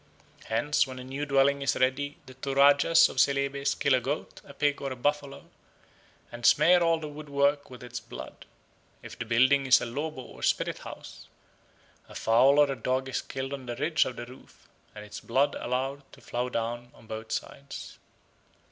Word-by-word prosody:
Hence, 130 +6 +1
when 130 -1 -8
a 125 - -7
new 135 +3 -5
dwelling 140 0 +3
is 140 - +1
ready 140 +3 0
the 130 - -12
Toradjas 140 +4 +4
of - - -5
Celebes 140 +1 +1
kill 140 -2 +2
a 130 - +3
goat, 140 +5 -4
a - - -13
pig, 145 0 0
or 135 -1 -3
a - - -4
buffalo, 145 +2 -2 0.9
and 120 0 -9
smear 170 +9 +5
all 165 -1 +3
the 155 - -6
woodwork 145 -1 -1
with 125 -1 -11
its 120 -1 -6
blood. 115 0 -10 0.6
If - - -10
the - - -3
building 130 +4 +3
is 130 - +7
a - - -4
lobo 140 +3 -4
or - - -13
spirit - - 0
house, - - -11 0.8
a - - -13
fowl 130 +5 +4
or 145 -1 +5
a - - -2
dog 130 +1 -2
is 130 - -2
killed 135 +1 -5
on 135 -2 -7
the 120 - -4
ridge 155 +5 +1
of 130 - -5
the - - -6
roof, 125 +2 -17 0.3
and 105 0 -9
its 105 0 -8
blood 135 +4 +1
allowed 135 +3 -3
to - - -15
flow 125 +1 -3
down 120 +1 -4
on - - -18
both 110 0 -7
sides. 140 +5 -6
135 Hz, 190 wpm, -28 LUFS, 125-145 Hz, 0.9 s, is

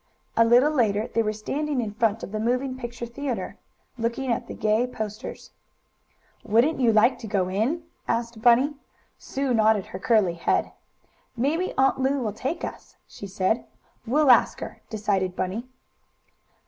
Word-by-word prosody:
A 230 - +6
little 245 +6 +5
later 220 -6 +1
they 230 - +3
were 215 -1 0
standing 275 +7 -2
in 220 -4 -2
front 225 -1 0
of - - -6
the 215 - -3
moving 250 +4 0
picture 240 -2 -6
theatre, 250 +1 -4 0.4
looking 235 +3 -1
at 235 - -2
the - - -7
gay 215 +3 +1
posters. 215 -3 -7 0.9
"Wouldn't 240 +9 +2
you 240 -3 +4
like 220 +4 +4
to 225 - -7
go 195 -3 0
in?" 235 - 0 0.2
asked 230 -1 -2
Bunny. 250 +5 +5 0.5
Sue 270 -1 -2
nodded 220 -3 +3
her 185 - -8
curly 205 -4 +3
head. 170 - 0 0.7
"Maybe 310 +9 0
Aunt 270 0 +3
Lu 265 +2 +1
will 220 -5 -2
take 270 +10 -3
us," - - -10
she 200 - -9
said. 190 +4 0 0.4
"We'll 285 +2 +5
ask 245 - +4
her," - - -8
decided 195 -4 -1
Bunny. 195 +8 -3
230 Hz, 160 wpm, -25 LUFS, 215-260 Hz, 0.9 s, A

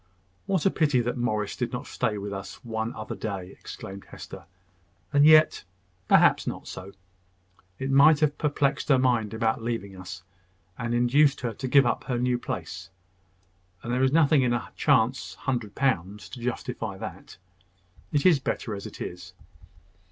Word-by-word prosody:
"What 190 -5 0
a 195 - +4
pity 145 -5 +2
that 120 +1 -2
Morris 110 -5 -1
did 120 -1 -3
not 125 - -5
stay 110 -4 -2
this 100 -1 -6
one 110 0 -2
other 110 - -6
day!" 95 -3 -5
exclaimed 95 0 -9
Hester. - - -10 0.7
"And 145 0 +6
yet, 155 0 +6 0.4
perhaps, - - +5
not - - -5
so. 95 +2 -8 0.8
It 135 +1 -3
might 145 +3 +6
have 150 -1 +1
perplexed 145 -1 0
her 135 - +6
mind 120 -4 +1
about 110 +1 0
leaving 115 -4 -4
us, 95 0 -9 0.5
and 115 +3 -2
induced 135 +4 +3
her 120 -2 -2
to 130 +5 -5
give 135 +1 +5
up 120 - -1
her 125 - -1
new 125 0 +1
place; 90 -1 -6 0.9
and 120 - -3
there 125 - +1
is 130 0 +3
nothing 155 -2 +4
in 125 -2 +2
a 120 - -3
chance 130 -2 +1
hundred 120 -6 -3
pounds 105 -7 -1
to 125 - -9
justify 120 0 -4
that. - - -9 0.7
It 145 +1 +1
is 170 -6 +6
better 120 -3 -3
as 100 -1 -6
it - - -11
is." 90 +1 -7
120 Hz, 165 wpm, -26 LUFS, 105-140 Hz, 0.9 s, And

